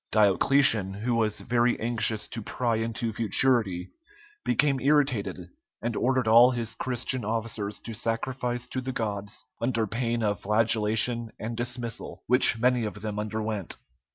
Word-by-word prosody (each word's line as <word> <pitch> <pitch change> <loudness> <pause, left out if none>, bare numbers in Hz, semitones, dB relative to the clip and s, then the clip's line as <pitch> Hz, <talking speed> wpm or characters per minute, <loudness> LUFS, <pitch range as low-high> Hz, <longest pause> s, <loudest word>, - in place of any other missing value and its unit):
Diocletian, 105 -1 +4
who 115 +4 -2
was 110 -2 0
very 120 0 +1
anxious 115 -2 0
to 115 - -6
pry 115 +2 -1
into 115 0 -3
futurity, 110 -4 +1 0.5
became 140 -3 +1
irritated, 130 -8 +1 0.4
and 115 0 -3
ordered 130 0 0
all 120 +3 +7
his 115 -3 -3
Christian 130 0 -2
officers 110 -1 -3
to 115 - -8
sacrifice 120 +2 -3
to 130 - -3
the 130 +1 -5
gods 105 -3 -4 0.2
under 115 -2 0
pain 115 +2 -2
of 105 -3 0
flagellation 110 +2 +1
and 115 +2 -5
dismissal, 120 0 -5
which 125 -2 +7
many 125 +1 +2
of 105 -1 -6
them 105 -1 -4
underwent. 105 -3 -4
115 Hz, 140 wpm, -26 LUFS, 110-125 Hz, 0.5 s, all